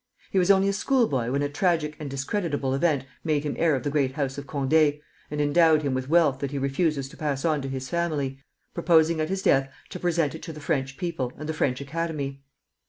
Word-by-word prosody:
He 190 Hz, -, +3 dB
was 180 Hz, +1 st, +2 dB
only 195 Hz, 0 st, +5 dB
a 200 Hz, -, +1 dB
school 245 Hz, +4 st, +2 dB
boy 125 Hz, -3 st, -1 dB
when 140 Hz, +2 st, 0 dB
a -, -, +1 dB
tragic 155 Hz, 0 st, 0 dB
and 150 Hz, -2 st, -5 dB
discreditable 140 Hz, 0 st, -2 dB
event 140 Hz, -2 st, +1 dB, 0.2 s
made 150 Hz, -3 st, 0 dB
him 150 Hz, -, -2 dB
heir 165 Hz, -3 st, +2 dB
of 130 Hz, -, -3 dB
the 145 Hz, -, -1 dB
great 140 Hz, -3 st, +1 dB
house 135 Hz, -1 st, -2 dB
of 140 Hz, -, -9 dB
Condé, 145 Hz, +1 st, +2 dB, 0.3 s
and 150 Hz, -, -4 dB
endowed 155 Hz, +1 st, +4 dB
him 140 Hz, -2 st, 0 dB
with 130 Hz, +1 st, -3 dB
wealth 155 Hz, -5 st, +4 dB
that 140 Hz, -, -2 dB
he 140 Hz, -, -4 dB
refuses 140 Hz, +1 st, 0 dB
to -, -, -14 dB
pass 145 Hz, -2 st, -2 dB
on 155 Hz, -3 st, +1 dB
to 135 Hz, -, -4 dB
his 130 Hz, -1 st, -4 dB
family, 145 Hz, -5 st, -2 dB, 0.3 s
proposing 160 Hz, -1 st, +3 dB
at 155 Hz, -, -1 dB
his 195 Hz, 0 st, -2 dB
death 135 Hz, 0 st, +3 dB, 0.2 s
to 180 Hz, -, -7 dB
present 170 Hz, -4 st, +1 dB
it 160 Hz, -, -8 dB
to 165 Hz, -, -7 dB
the 155 Hz, -, -9 dB
French 135 Hz, -3 st, -2 dB
people 165 Hz, -8 st, -3 dB
and 150 Hz, -, -6 dB
the 160 Hz, -, -1 dB
French 125 Hz, -5 st, 0 dB
Academy. 140 Hz, -2 st, -4 dB
150 Hz, 235 wpm, -26 LUFS, 135-165 Hz, 0.3 s, only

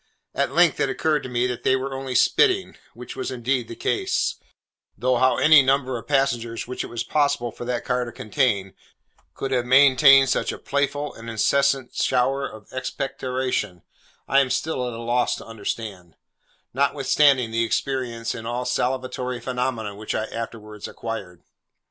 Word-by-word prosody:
At -, -, 0 dB
length 170 Hz, -2 st, +4 dB
it 135 Hz, -, +1 dB
occurred 150 Hz, +3 st, 0 dB
to 130 Hz, -, -7 dB
me 120 Hz, 0 st, 0 dB
that 125 Hz, -1 st, -3 dB
they 130 Hz, -, +3 dB
were 135 Hz, +1 st, -3 dB
only 135 Hz, -1 st, -5 dB
spitting, 385 Hz, -, +3 dB, 0.2 s
which -, -, -9 dB
was -, -, -4 dB
indeed 125 Hz, -1 st, -1 dB
the 115 Hz, -, -8 dB
case; -, -, -1 dB, 0.6 s
though 125 Hz, +3 st, +1 dB
how 130 Hz, +1 st, +3 dB
any 155 Hz, -1 st, +7 dB
number 130 Hz, -1 st, +1 dB
of 115 Hz, -, -7 dB
passengers 120 Hz, -5 st, 0 dB
which 125 Hz, +1 st, -4 dB
it -, -, -6 dB
was 120 Hz, -1 st, -4 dB
possible 140 Hz, -3 st, 0 dB
for 120 Hz, -, -8 dB
that 120 Hz, -1 st, -3 dB
car 125 Hz, -1 st, 0 dB
to 120 Hz, -, -7 dB
contain, 110 Hz, -6 st, -1 dB, 0.6 s
could 135 Hz, -, -4 dB
have 125 Hz, -2 st, +1 dB
maintained 135 Hz, 0 st, +7 dB
such -, -, 0 dB
a -, -, -6 dB
playful 140 Hz, +1 st, -2 dB
and 115 Hz, +1 st, -9 dB
incessant 135 Hz, +3 st, +1 dB
shower 135 Hz, +2 st, +1 dB
of 110 Hz, -1 st, -12 dB
expectoration, 130 Hz, -, -3 dB, 0.4 s
I 135 Hz, -, +4 dB
am 135 Hz, -2 st, +2 dB
still 130 Hz, 0 st, -1 dB
at 120 Hz, -, -5 dB
a -, -, -7 dB
loss 120 Hz, +1 st, 0 dB
to -, -, -10 dB
understand: 105 Hz, -5 st, -6 dB, 0.6 s
notwithstanding 135 Hz, -2 st, +3 dB
the 115 Hz, +1 st, +1 dB
experience 120 Hz, -1 st, -2 dB
in 115 Hz, 0 st, -7 dB
all 120 Hz, +1 st, -2 dB
salivatory 125 Hz, 0 st, -2 dB
phenomena 125 Hz, -4 st, -3 dB
which 105 Hz, +2 st, -5 dB
I 110 Hz, -, 0 dB
afterwards 110 Hz, -2 st, -7 dB
acquired. 95 Hz, -7 st, -7 dB
125 Hz, 165 wpm, -23 LUFS, 115-135 Hz, 0.6 s, any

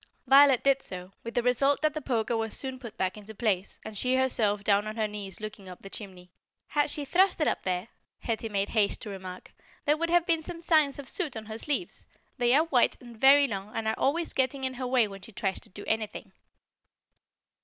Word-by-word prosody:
Violet 270 Hz, -1 st, +6 dB
did 275 Hz, -1 st, +3 dB
so, 180 Hz, 0 st, -7 dB
with 230 Hz, -, -7 dB
the 245 Hz, -, +2 dB
result 275 Hz, +3 st, +3 dB
that 310 Hz, -1 st, +3 dB
the 310 Hz, -, -4 dB
poker 235 Hz, -3 st, 0 dB
was 225 Hz, -1 st, -2 dB
soon 265 Hz, -1 st, -5 dB
put 235 Hz, -4 st, -10 dB
back 190 Hz, +2 st, -1 dB
into 210 Hz, +1 st, -11 dB
place, 200 Hz, -4 st, -1 dB
and 220 Hz, -1 st, -7 dB
she 255 Hz, +5 st, +1 dB
herself 220 Hz, -6 st, +1 dB
down 205 Hz, +1 st, +2 dB
on 215 Hz, -, -5 dB
her 220 Hz, -2 st, 0 dB
knees 205 Hz, -3 st, -6 dB
looking 210 Hz, -3 st, -8 dB
up 180 Hz, -, -11 dB
the 195 Hz, -, -10 dB
chimney. 185 Hz, -4 st, -9 dB, 0.4 s
"Had 295 Hz, 0 st, +1 dB
she 290 Hz, 0 st, -3 dB
thrust 370 Hz, +6 st, +3 dB
it 305 Hz, -, +2 dB
up -, -, 0 dB
there," 185 Hz, +2 st, -2 dB, 0.3 s
Hetty 225 Hz, -1 st, -3 dB
made 200 Hz, -1 st, -1 dB
haste 215 Hz, -3 st, +2 dB
to 210 Hz, -, -6 dB
remark, 185 Hz, -2 st, -9 dB, 0.3 s
"there 295 Hz, -, +4 dB
would 335 Hz, +1 st, -1 dB
have 345 Hz, 0 st, +3 dB
been 330 Hz, -3 st, +1 dB
some 340 Hz, +1 st, -7 dB
signs 310 Hz, -4 st, +3 dB
of 285 Hz, -2 st, -8 dB
soot 300 Hz, -, -2 dB
on 220 Hz, -, -7 dB
her 220 Hz, +1 st, -7 dB
sleeves. 295 Hz, +6 st, -3 dB, 0.3 s
They 240 Hz, -1 st, +3 dB
are 305 Hz, -, +5 dB
white 260 Hz, -7 st, +2 dB
and 240 Hz, -2 st, -12 dB
very 275 Hz, +4 st, +6 dB
long 200 Hz, -2 st, -6 dB
and 225 Hz, -1 st, -2 dB
are 220 Hz, -, +1 dB
always 330 Hz, +5 st, 0 dB
getting 265 Hz, +1 st, 0 dB
in 260 Hz, 0 st, -1 dB
her 255 Hz, 0 st, -4 dB
way 250 Hz, -3 st, +3 dB
when 195 Hz, -1 st, -10 dB
she 225 Hz, -, -11 dB
tries 195 Hz, -3 st, -2 dB
to -, -, -11 dB
do 205 Hz, +2 st, -10 dB
anything." 220 Hz, -1 st, -3 dB
235 Hz, 230 wpm, -28 LUFS, 205-275 Hz, 0.4 s, Violet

